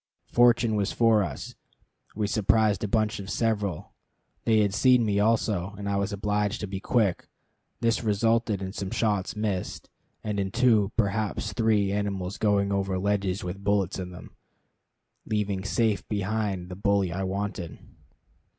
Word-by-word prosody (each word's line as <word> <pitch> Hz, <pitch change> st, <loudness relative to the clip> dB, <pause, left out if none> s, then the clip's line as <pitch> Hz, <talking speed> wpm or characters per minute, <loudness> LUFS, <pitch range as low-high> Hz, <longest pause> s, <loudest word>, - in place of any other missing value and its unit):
Fortune 120 Hz, -2 st, +4 dB
was 100 Hz, -2 st, 0 dB
for 115 Hz, -2 st, +4 dB
us. 85 Hz, -9 st, -5 dB, 0.6 s
We 105 Hz, 0 st, 0 dB
surprised 105 Hz, 0 st, +2 dB
a -, -, 0 dB
bunch 110 Hz, +1 st, 0 dB
of 100 Hz, -1 st, -7 dB
several. 105 Hz, -8 st, -1 dB, 0.5 s
They 110 Hz, -1 st, +4 dB
had 100 Hz, -2 st, +1 dB
seen 125 Hz, +2 st, +4 dB
me 100 Hz, -1 st, +1 dB
also, 105 Hz, -3 st, +1 dB
and 100 Hz, 0 st, -5 dB
I 100 Hz, 0 st, 0 dB
was 100 Hz, +1 st, -1 dB
obliged 105 Hz, +1 st, -1 dB
to 105 Hz, -, -3 dB
be 95 Hz, 0 st, -5 dB
quick. 105 Hz, -3 st, 0 dB, 0.5 s
This 115 Hz, 0 st, +1 dB
resulted 110 Hz, -1 st, +1 dB
in 95 Hz, 0 st, -5 dB
some 100 Hz, -3 st, -4 dB
shots 105 Hz, -4 st, -1 dB
missing, 105 Hz, -4 st, -3 dB, 0.4 s
and 105 Hz, -1 st, -2 dB
in 95 Hz, -1 st, -1 dB
two, 110 Hz, -2 st, +3 dB
perhaps 105 Hz, -1 st, -1 dB
three, 105 Hz, -3 st, +2 dB
animals 100 Hz, -1 st, -2 dB
going 100 Hz, -2 st, +2 dB
over 95 Hz, -1 st, 0 dB
ledges 100 Hz, -1 st, -1 dB
with 95 Hz, +2 st, -6 dB
bullets 100 Hz, -2 st, +1 dB
in 90 Hz, -1 st, -5 dB
them, 90 Hz, 0 st, -11 dB, 1.0 s
leaving 105 Hz, -3 st, -1 dB
safe 110 Hz, +1 st, 0 dB
behind 100 Hz, -3 st, -2 dB
the 90 Hz, -, -6 dB
billy 100 Hz, -2 st, +1 dB
I 95 Hz, -, -3 dB
wanted. 95 Hz, -3 st, -3 dB
100 Hz, 155 wpm, -27 LUFS, 95-110 Hz, 1.0 s, Fortune